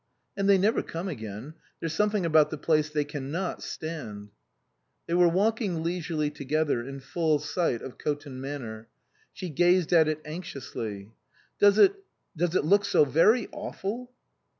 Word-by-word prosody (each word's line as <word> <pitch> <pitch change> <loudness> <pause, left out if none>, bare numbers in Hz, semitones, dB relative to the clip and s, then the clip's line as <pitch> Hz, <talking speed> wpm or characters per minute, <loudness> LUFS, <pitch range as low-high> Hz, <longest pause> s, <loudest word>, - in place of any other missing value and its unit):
" - - -49
And 200 0 0
they 200 - +7
never 205 +4 +2
come 170 +4 -5
again. 110 - -6 0.3
There's 165 -1 -3
some 210 +4 +2
thing 205 -4 -1
about 155 -2 +5
the 155 - -5
place 155 0 +1
they 150 -1 0
can 145 -2 -6
not 180 +4 -3
stand." 115 -11 -6 0.8
They 170 - -3
were 175 0 +5
walking 195 -2 0
leisurely 165 -3 -1
together 145 -2 0
in 135 +2 -7
full 155 +2 +1
sight 150 -3 -1
of 130 - -9
Coton 145 -3 -4
Manor. 120 -6 -6 0.4
She 185 - -6
gazed 175 +2 +3
at 160 -2 +6
it 155 0 -2
anxi 160 +2 -7
ously. 110 -6 -6 0.2
" - - -35
Does 205 0 +6
it 385 - +7 0.4
does 175 +2 0
it 150 - +2
look 200 +5 +4
so 200 -6 +4
very 210 - +4
awful 240 +6 -5
160 Hz, 175 wpm, -27 LUFS, 145-185 Hz, 0.8 s, they